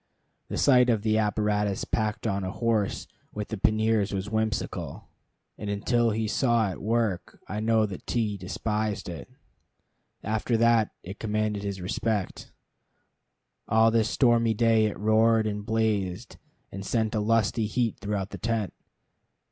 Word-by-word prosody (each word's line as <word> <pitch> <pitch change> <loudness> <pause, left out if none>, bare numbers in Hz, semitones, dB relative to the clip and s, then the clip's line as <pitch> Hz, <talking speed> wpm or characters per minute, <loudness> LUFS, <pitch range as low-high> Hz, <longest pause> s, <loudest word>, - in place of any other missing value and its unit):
The - - -4
sight 125 -2 +5
of 110 -3 +1
the 110 0 +2
apparatus 105 -1 0
packed 110 0 -2
on 100 -3 -1
a 95 - -2
horse 110 -1 -1 0.3
with 105 -1 -4
the 110 - -3
panniers 110 0 +2
was 100 +2 -4
whimsical, 110 -2 -2 0.5
and 105 - -4
until 115 +3 +1
he 110 0 -1
saw 115 -3 +2
it - - -8
work 110 -4 -1
I 105 - -4
know 110 0 +3
that 100 -3 -8
T 110 -4 0
despised 105 +3 -3
it. 85 -4 -7 0.9
After 110 +3 0
that, 115 -1 +4
it 95 +3 -8
commanded 110 -1 -1
his 100 -2 -4
respect. 105 +1 -2 1.2
All 110 +1 +4
this 110 -1 +2
stormy 115 -3 +3
day 115 -1 +3
it 105 - -5
roared 110 +1 +3
and 105 -1 -3
blazed, 105 -5 -1 0.3
and 100 +1 -6
sent 110 +1 0
a 110 - 0
lusty 110 0 +1
heat 115 0 -1
throughout 100 -1 -3
the - - -7
tent. 110 -3 -1
110 Hz, 150 wpm, -27 LUFS, 105-115 Hz, 1.2 s, sight